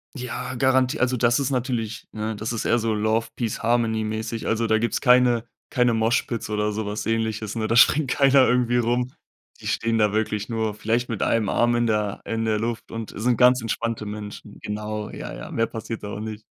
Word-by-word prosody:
Ja 125 Hz, 0 st, -5 dB
garanti 130 Hz, +2 st, +2 dB
also, 130 Hz, 0 st, +2 dB
das 120 Hz, 0 st, +3 dB
ist 140 Hz, 0 st, -1 dB
natürlich, 120 Hz, -4 st, -2 dB
ne, 110 Hz, 0 st, -3 dB
das 110 Hz, +2 st, -4 dB
ist 115 Hz, -, -3 dB
eher 120 Hz, -, +3 dB
so 110 Hz, -1 st, 0 dB
Love 110 Hz, +2 st, +1 dB
Peace 115 Hz, -4 st, -3 dB
Harmony 115 Hz, -1 st, +1 dB
mäßig. 110 Hz, +1 st, -4 dB
Also, 115 Hz, +1 st, +1 dB
da 110 Hz, -, +3 dB
gibt's 115 Hz, +2 st, 0 dB
keine 125 Hz, -2 st, +4 dB, 0.2 s
keine 125 Hz, -1 st, +2 dB
Moshpits 115 Hz, 0 st, 0 dB
oder 105 Hz, 0 st, 0 dB
so 110 Hz, +1 st, -3 dB
was 105 Hz, +1 st, -4 dB
Ähnliches, 110 Hz, -1 st, -1 dB
ne? 110 Hz, -1 st, -1 dB
Da 115 Hz, -, +2 dB
springt 140 Hz, +1 st, +5 dB
keiner 135 Hz, -1 st, +5 dB
irgendwie 125 Hz, -1 st, +2 dB
rum. 120 Hz, +1 st, 0 dB, 0.5 s
Die -, -, -7 dB
stehen 115 Hz, 0 st, 0 dB
da 105 Hz, -2 st, +3 dB
wirklich 105 Hz, 0 st, -1 dB
nur 110 Hz, -2 st, -1 dB
vielleicht 115 Hz, +3 st, -1 dB
mit 115 Hz, -4 st, -4 dB
einem 115 Hz, -3 st, +1 dB
Arm 120 Hz, +3 st, +2 dB
in 120 Hz, 0 st, +1 dB
der 105 Hz, -2 st, 0 dB
in 115 Hz, 0 st, -2 dB
der 110 Hz, -1 st, +1 dB
Luft 115 Hz, +1 st, -4 dB
und 115 Hz, -1 st, -6 dB
sind 120 Hz, +2 st, +1 dB
ganz 125 Hz, 0 st, +5 dB
entspannte 115 Hz, 0 st, -2 dB
Menschen. 105 Hz, 0 st, -8 dB
Genau, 105 Hz, 0 st, -4 dB
ja, -, -, -7 dB
ja. -, -, -8 dB
Mehr 115 Hz, -, 0 dB
passiert 115 Hz, 0 st, -6 dB
da 105 Hz, -, -5 dB
auch 105 Hz, -, -5 dB
nicht. 110 Hz, 0 st, -6 dB
115 Hz, 210 wpm, -24 LUFS, 110-120 Hz, 0.5 s, springt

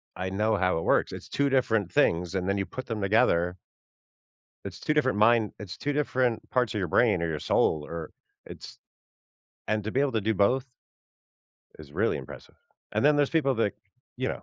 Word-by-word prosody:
I 95 Hz, 0 st, -3 dB
know 105 Hz, +3 st, +1 dB
how 90 Hz, -2 st, +1 dB
it -, -, -4 dB
works, -, -, +2 dB
it's -, -, -8 dB
2 140 Hz, 0 st, +1 dB
different 115 Hz, -8 st, +1 dB
things, 85 Hz, +1 st, +2 dB
and 95 Hz, -1 st, -1 dB
then 100 Hz, +1 st, 0 dB
you 95 Hz, -, -1 dB
put 130 Hz, +5 st, -7 dB
them 110 Hz, -3 st, -4 dB
together 90 Hz, -3 st, +2 dB, 1.1 s
It's -, -, -7 dB
2 150 Hz, -, -1 dB
different 130 Hz, -7 st, +1 dB
mind 110 Hz, 0 st, +4 dB
it's 100 Hz, -4 st, -8 dB
2 145 Hz, -, -2 dB
different 130 Hz, -5 st, 0 dB
parts 125 Hz, -4 st, +1 dB
of -, -, -1 dB
your 95 Hz, -, -1 dB
brain, 105 Hz, +1 st, +3 dB
or 85 Hz, -, 0 dB
your 75 Hz, -2 st, -3 dB
soul, 75 Hz, -2 st, +1 dB
or 80 Hz, -1 st, -7 dB, 0.3 s
it's -, -, -11 dB, 0.9 s
and 110 Hz, -1 st, 0 dB
to 110 Hz, -, -4 dB
be 135 Hz, -, +1 dB
able 140 Hz, -1 st, +1 dB
to 110 Hz, -, +1 dB
do 110 Hz, +2 st, 0 dB
both 125 Hz, +7 st, +2 dB, 1.1 s
is 75 Hz, -2 st, -13 dB
really -, -, +1 dB
impressive. -, -, -10 dB, 0.4 s
And -, -, 0 dB
then 150 Hz, 0 st, +5 dB
there's 145 Hz, -1 st, +2 dB
people 145 Hz, -5 st, +2 dB
that, 110 Hz, -3 st, 0 dB, 0.4 s
you 130 Hz, +1 st, -1 dB
know -, -, -5 dB
110 Hz, 200 wpm, -27 LUFS, 95-130 Hz, 1.1 s, then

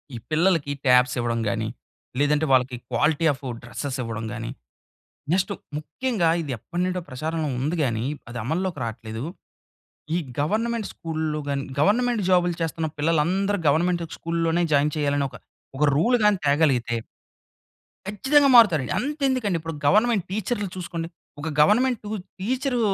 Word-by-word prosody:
ఈ -, -, -4 dB
పిల్లలకి 160 Hz, -2 st, +2 dB
ట్యాబ్స్ 125 Hz, 0 st, +5 dB
ఇవ్వడం 120 Hz, -1 st, 0 dB
గానీ, 110 Hz, 0 st, -1 dB, 0.5 s
లేదంటే 150 Hz, +2 st, +2 dB
వాళ్ళకి 130 Hz, -1 st, +3 dB, 0.2 s
క్వాలిటీ 155 Hz, +2 st, +2 dB
ఆఫ్ 140 Hz, +1 st, -13 dB, 0.2 s
డ్ర‌సెస్ 130 Hz, +3 st, -4 dB
ఇవ్వడం 115 Hz, -1 st, -4 dB
గానీ, -, -, -5 dB, 0.8 s
నెక్స్ట్ 190 Hz, +3 st, +1 dB, 0.3 s
ముఖ్యంగా 175 Hz, -, -1 dB
ఇది 145 Hz, -4 st, -5 dB
ఎప్పటి 170 Hz, +10 st, -4 dB
నుండో 185 Hz, 0 st, -2 dB
ప్రచారంలో 155 Hz, +4 st, -2 dB
ఉంది 150 Hz, +7 st, -1 dB
గానీ, 115 Hz, -3 st, -1 dB, 0.2 s
అది 120 Hz, -, -6 dB
అమల్లోకి 170 Hz, -, -2 dB
రాట్లేదు. 110 Hz, 0 st, -6 dB, 0.9 s
ఈ -, -, +3 dB, 0.2 s
గవర్నమెంట్ 220 Hz, +8 st, 0 dB
స్కూల్లు 155 Hz, -2 st, -3 dB
గానీ, 140 Hz, -1 st, -1 dB
గవర్నమెంట్ 235 Hz, +7 st, +2 dB
జాబ్‌లు 175 Hz, -1 st, +3 dB
చేస్తున్న 165 Hz, 0 st, -1 dB
పిల్లలందరూ 175 Hz, +6 st, +1 dB
గవర్నమెంట్ 170 Hz, +4 st, +2 dB
స్కూల్‌లోనే 165 Hz, 0 st, 0 dB
జాయిన్ 145 Hz, +1 st, +3 dB
చేయాలనే 145 Hz, -1 st, +1 dB
ఒక, 125 Hz, -, -11 dB, 0.4 s
ఒక 150 Hz, -, +3 dB
రూల్ 240 Hz, +10 st, +3 dB
గానీ 210 Hz, -2 st, +4 dB
తేగలిగితే... 135 Hz, -6 st, +2 dB, 1.1 s
కచ్చితంగా 275 Hz, +8 st, +3 dB
మారుతారు. 195 Hz, -, +7 dB, 0.2 s
అంతేం‌దుకండి! 260 Hz, -, 0 dB
ఇప్పుడు 165 Hz, 0 st, -6 dB
గవర్నమెంట్ 215 Hz, +4 st, +4 dB
టీచర్లు 205 Hz, +1 st, -2 dB
చూసుకోండి. 170 Hz, -2 st, -4 dB, 0.3 s
ఒక 155 Hz, +2 st, -3 dB
గవర్నమెంటు 230 Hz, +5 st, +3 dB, 0.3 s
టీచరూ 250 Hz, +5 st, -1 dB
165 Hz, 130 wpm, -24 LUFS, 140-200 Hz, 1.1 s, మారుతారు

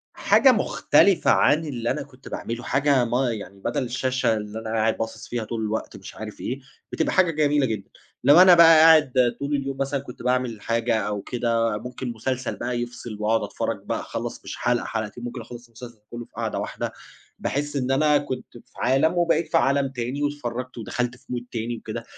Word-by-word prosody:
حاجة 265 Hz, -, +5 dB
مختلفة 200 Hz, -4 st, +3 dB
عن 155 Hz, +2 st, +3 dB
اللي 120 Hz, -5 st, -2 dB
أنا 145 Hz, -, -2 dB
كنت 135 Hz, -2 st, -17 dB
باعمله، 115 Hz, +1 st, -5 dB
حاجة 135 Hz, -2 st, +2 dB
ما 125 Hz, +1 st, +1 dB
يعني 100 Hz, -2 st, -7 dB
بدل 120 Hz, +6 st, -2 dB
الشاشة 130 Hz, -1 st, 0 dB
اللي 105 Hz, +1 st, -6 dB
أنا 115 Hz, -, -6 dB
قاعد 110 Hz, 0 st, +1 dB
باصِص 115 Hz, 0 st, -5 dB
فيها 120 Hz, -2 st, -3 dB
طول 115 Hz, +1 st, -4 dB
الوقت 110 Hz, -1 st, -3 dB
مش 95 Hz, -, -11 dB
عارف 110 Hz, -1 st, -8 dB
إيه، 130 Hz, +3 st, -3 dB, 0.3 s
بتبقى 160 Hz, -, 0 dB
حاجة 180 Hz, -3 st, +4 dB
جميلة 145 Hz, -2 st, +2 dB
جدًا. 110 Hz, -4 st, -4 dB, 0.3 s
لو 145 Hz, +6 st, +7 dB
أنا 185 Hz, -1 st, +9 dB
بقى 165 Hz, -1 st, +8 dB
قاعد 135 Hz, -7 st, +5 dB
طول 140 Hz, +1 st, -1 dB
اليوم 135 Hz, -1 st, -3 dB
مثلًا 135 Hz, +1 st, -1 dB
كنت 130 Hz, -2 st, -11 dB
باعمل 125 Hz, -3 st, 0 dB
حاجة 115 Hz, +1 st, 0 dB
أو 105 Hz, -1 st, -3 dB
كده، 115 Hz, -2 st, 0 dB
ممكن 125 Hz, +2 st, -6 dB
مسلسل 130 Hz, +3 st, -3 dB
بقى 120 Hz, 0 st, -3 dB
يفْصِل 120 Hz, -2 st, -7 dB
وأقعد 110 Hz, +1 st, +1 dB
أتفرج -, -, -3 dB
بقى -, -, -2 dB
أخلّص -, -, -5 dB
مش -, -, -7 dB
حلقة 120 Hz, 0 st, 0 dB
حلقتين، 110 Hz, +1 st, -4 dB
ممكن 120 Hz, 0 st, -5 dB
أخلّص 120 Hz, +1 st, -11 dB
المسلسل 120 Hz, -1 st, -12 dB
كلّه 120 Hz, 0 st, -6 dB
في -, -, -31 dB
قعدة -, -, -2 dB
واحدة، -, -, -4 dB, 0.5 s
باحس 145 Hz, +1 st, -2 dB
إن 130 Hz, -2 st, 0 dB
أنا 150 Hz, +2 st, +4 dB
كنت 135 Hz, -3 st, -5 dB
في -, -, -19 dB
عالَم 135 Hz, +7 st, +2 dB
وبقيت 170 Hz, -1 st, +1 dB
في -, -, +4 dB
عالَم 135 Hz, +2 st, +2 dB
تاني 130 Hz, +3 st, -4 dB
واتفرجت 130 Hz, -4 st, -4 dB
ودخلت 125 Hz, +2 st, -3 dB
في 125 Hz, -, -27 dB
mood 120 Hz, -1 st, -3 dB
تاني 115 Hz, 0 st, -3 dB
وكده، 115 Hz, +1 st, -6 dB
125 Hz, 195 wpm, -24 LUFS, 115-140 Hz, 0.5 s, أنا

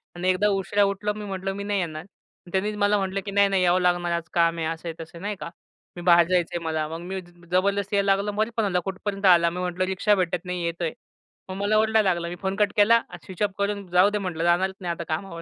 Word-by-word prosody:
आणि 180 Hz, +1 st, -1 dB
एकदा 185 Hz, +3 st, +2 dB
उशिरा 200 Hz, +1 st, +1 dB
उठलो 200 Hz, +1 st, -1 dB
मी 210 Hz, 0 st, -7 dB
म्हटलं 195 Hz, -1 st, -3 dB
"मी 200 Hz, -, -5 dB
नाही 205 Hz, 0 st, -1 dB
येणार." 155 Hz, -4 st, -3 dB
आणि 180 Hz, 0 st, -21 dB
त्यांनीच 205 Hz, +3 st, -1 dB
मला 205 Hz, 0 st, +3 dB
म्हटलं 195 Hz, 0 st, -2 dB
की 200 Hz, -, -4 dB
"नाही, 200 Hz, 0 st, +4 dB
नाही 195 Hz, -2 st, +1 dB
यावं 180 Hz, +1 st, +3 dB
लागणार, 175 Hz, -1 st, +1 dB
आज 170 Hz, -1 st, -2 dB
काम 170 Hz, -1 st, +2 dB
आहे." 165 Hz, -, -2 dB
असं 165 Hz, +1 st, -5 dB
आहे 160 Hz, -, -6 dB
तसं 165 Hz, +1 st, -13 dB
नाही 205 Hz, +1 st, -3 dB
का. -, -, -6 dB, 0.5 s
'मी 175 Hz, -, -7 dB
बाहेर 170 Hz, -1 st, +6 dB
जायचं 180 Hz, -2 st, +1 dB
आहे 170 Hz, -, -3 dB
मला." 160 Hz, -1 st, -1 dB
मग 165 Hz, +1 st, -6 dB
मी 190 Hz, +1 st, -4 dB, 0.3 s
जबरदस्ती 200 Hz, +2 st, +1 dB
जायला 200 Hz, 0 st, +3 dB
लागलं. 200 Hz, +1 st, -2 dB
मध्येच 215 Hz, +3 st, -1 dB
फोन 225 Hz, -, +2 dB
आला 180 Hz, -3 st, +1 dB
"कुठपर्यंत 195 Hz, +1 st, -4 dB
आला?" 170 Hz, -2 st, +6 dB
मी 180 Hz, +2 st, -6 dB
म्हटलं 180 Hz, 0 st, -1 dB
"रिक्षा 190 Hz, +3 st, +2 dB
भेटत 180 Hz, -2 st, -1 dB
नाही 180 Hz, -1 st, -3 dB
येतोय." 170 Hz, -1 st, -2 dB, 0.6 s
मग 185 Hz, -, -5 dB
मला 210 Hz, +1 st, +2 dB
ओरडायला 220 Hz, -2 st, +3 dB
लागलं 170 Hz, 0 st, -4 dB
मी 175 Hz, -, -5 dB
फोन 190 Hz, 0 st, -1 dB
कट 205 Hz, 0 st, +2 dB
केला 230 Hz, +3 st, +6 dB, 0.2 s
स्विच 185 Hz, 0 st, -10 dB
ऑफ 205 Hz, -, +1 dB
करून 200 Hz, 0 st, -2 dB
जाऊ 180 Hz, +3 st, +5 dB
दे 210 Hz, -, -1 dB
म्हटलं 180 Hz, -5 st, -3 dB
जाणारच 180 Hz, +3 st, +2 dB
नाही 175 Hz, -, -2 dB
आता 170 Hz, -, -6 dB
कामावर. 170 Hz, 0 st, -5 dB
190 Hz, 255 wpm, -25 LUFS, 175-200 Hz, 0.6 s, बाहेर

